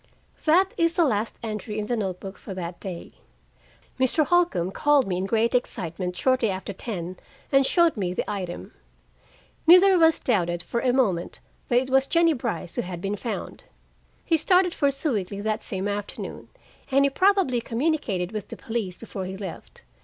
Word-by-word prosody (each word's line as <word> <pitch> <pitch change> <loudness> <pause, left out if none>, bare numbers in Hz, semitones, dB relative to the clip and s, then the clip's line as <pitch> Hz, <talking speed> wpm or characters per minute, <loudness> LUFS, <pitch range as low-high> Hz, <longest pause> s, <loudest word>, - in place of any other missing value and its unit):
That 365 +5 +4
is 335 0 +2
the 340 -1 +3
last 225 -4 -1
entry 215 -1 -4
in 210 - -2
the 240 - -1
note 190 -5 -3
book 195 0 -9
for 195 - -8
that 175 -1 -6
day. 185 -4 -7 0.9
Mr. 260 +4 +3
Holcombe 340 - +2
called 290 +3 +3
me 180 -2 -1
in 190 +1 -2
great 230 +3 +1
excitement 180 -6 -2
shortly 255 -4 +2
after 190 +1 -4
ten 185 -4 -5 0.3
and 275 -1 +4
showed 340 -2 +3
me 190 -5 -2
the 180 - -3
item. 185 -4 -5 0.9
Neither 365 +3 +8
of 355 - +3
us 325 -1 +5
doubted 175 -7 0
for 235 - -2
a 250 +1 +2
moment 205 -10 0 0.3
that 240 - +2
it 260 0 -6
was 270 0 +4
Jennie 335 -1 +4
Brice 230 - -4
who - - +2
had 175 -1 -6
been 195 +3 -2
found. 220 +2 -6 0.6
He 330 - +3
started 360 +2 +3
for 285 - +2
Sewickley 220 - -2
that 215 0 -1
same 190 +1 -3
afternoon, 205 0 -5 0.4
and 275 +1 +4
he 280 - +1
probably 370 -8 +3
communicated 230 - -1
with 215 -3 -5
the - - -8
police 220 -7 -4
before 200 -4 -6
he 190 +1 -6
left. 190 -4 -9
225 Hz, 180 wpm, -25 LUFS, 190-280 Hz, 0.9 s, Neither